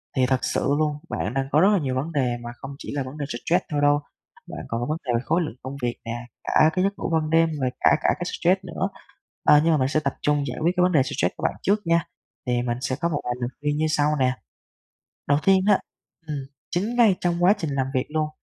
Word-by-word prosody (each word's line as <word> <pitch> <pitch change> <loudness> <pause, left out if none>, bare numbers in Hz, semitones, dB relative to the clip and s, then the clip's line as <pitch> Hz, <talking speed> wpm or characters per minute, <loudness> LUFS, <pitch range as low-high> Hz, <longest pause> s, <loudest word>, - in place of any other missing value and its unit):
Thì 130 -2 +3
thật 130 0 +1
sự - - 0
luôn, 150 -1 0
bạn 105 - -2
đang 135 0 0
có 150 - +4
rất 190 - +6
là - - +4
nhiều 130 -5 -2
vấn 140 +6 -2
đề 130 -5 0
mà 120 - -6
không 135 - -8
chỉ - - -7
là 140 - -1
vấn 130 +3 -9
đề 145 - -3
stress 165 +9 0
thôi 145 -1 0
đâu, 145 0 +4 0.5
bạn - - -6
còn 115 +1 -3
có - - -1
vấn 155 - 0
đề 125 - 0
khối 165 +3 +2
lượng 150 -8 -4
công 130 +2 -6
việc 120 -1 -1
nè, 115 - -4 0.3
cả 155 - +4
cái 185 - +1
giấc 200 +1 +1
ngủ - - -3
ban 160 -1 +1
đêm 165 +1 +4
rồi 130 - +1
cả - - +5
cả - - +2
cái - - -2
stress 185 +2 +1
nữa, 185 +2 -3 0.5
à, 150 - +6
nhưng 165 0 +3
mà - - +3
mình 130 -2 +1
sẽ 150 +3 +1
tập 140 -3 -2
trung 145 -1 +1
giải 125 - -5
quyết 165 +3 +3
cái - - +4
vấn 180 - +3
đề 150 -6 +4
stress 130 - -1
của - - -9
bạn - - +1
trước 205 +2 +2
nha. 170 -1 +3 0.4
Thì 120 -1 +1
mình 120 -1 -2
sẽ 130 -1 -1
có 170 - +1
một 150 -3 -2
vài 125 - -1
lời 120 -1 -2
khuyên 145 0 0
như 155 - +1
sau 150 -2 +2
nè. 130 -1 +3 1.0
Đầu 145 0 +4
tiên 190 -1 +5
á, 205 - +6 0.5
ừm, 150 -1 -3 0.3
chính 205 +7 -1
ngay 225 -6 +5
trong 175 0 0
quá 190 - +7
trình 165 -6 -3
làm 135 -2 0
việc 130 - 0
luôn, 155 0 -1
150 Hz, 270 wpm, -24 LUFS, 130-170 Hz, 1.0 s, quá